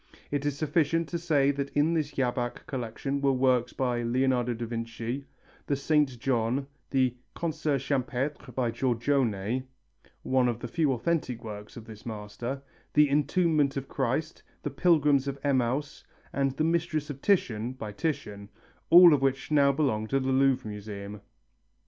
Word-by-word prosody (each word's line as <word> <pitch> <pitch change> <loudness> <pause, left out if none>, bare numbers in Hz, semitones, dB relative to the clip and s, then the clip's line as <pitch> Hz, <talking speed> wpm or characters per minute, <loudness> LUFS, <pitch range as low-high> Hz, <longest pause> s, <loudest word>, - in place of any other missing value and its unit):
It 145 0 -1
is 145 -1 -2
sufficient 160 +1 +1
to 170 - -2
say 145 -4 +3
that 140 0 -3
in 150 +3 +2
this 155 -3 0
Jabach 125 -2 -2
collection 135 +2 -3
were 140 -1 +3
works 125 -2 +2
by 125 -2 -1
Leonardo 125 0 +1
da 115 +1 -4
Vinci, 115 +3 -4 0.4
the 140 - +1
Saint 140 -2 +1
John, 125 +2 0 0.2
the 130 -2 +2 0.2
"Concert 155 -3 -1
champêtre" 135 -1 -2
by 120 -3 0
Giorgione 120 -2 0 0.6
one 130 -1 +2
of 120 -2 -1
the - - -4
few 150 +3 +1
authentic 125 -3 -1
works 105 0 -8
of 115 - -9
this 110 -1 -11
master 115 +5 -5 0.3
the 150 -1 +6
Entombment 150 -1 +2
of 135 0 -4
Christ, 140 +4 -2 0.2
the - - -3
Pilgrims 150 -5 +3
of 140 0 -3
Emmaus 140 +1 0 0.3
and 135 -1 +1
the 155 - +1
Mistress 160 -2 0
of 140 -1 -9
Titian 125 - +1
by 110 -5 -7
Titian, 105 -6 -4 0.4
all 175 -1 +9
of 145 - +2
which 135 +2 0
now 140 -2 +5
belong 130 -7 0
to 135 +4 +1
the 130 0 -1
Louvre 130 -2 +2
Museum. 105 -1 -7
135 Hz, 155 wpm, -28 LUFS, 120-145 Hz, 0.6 s, all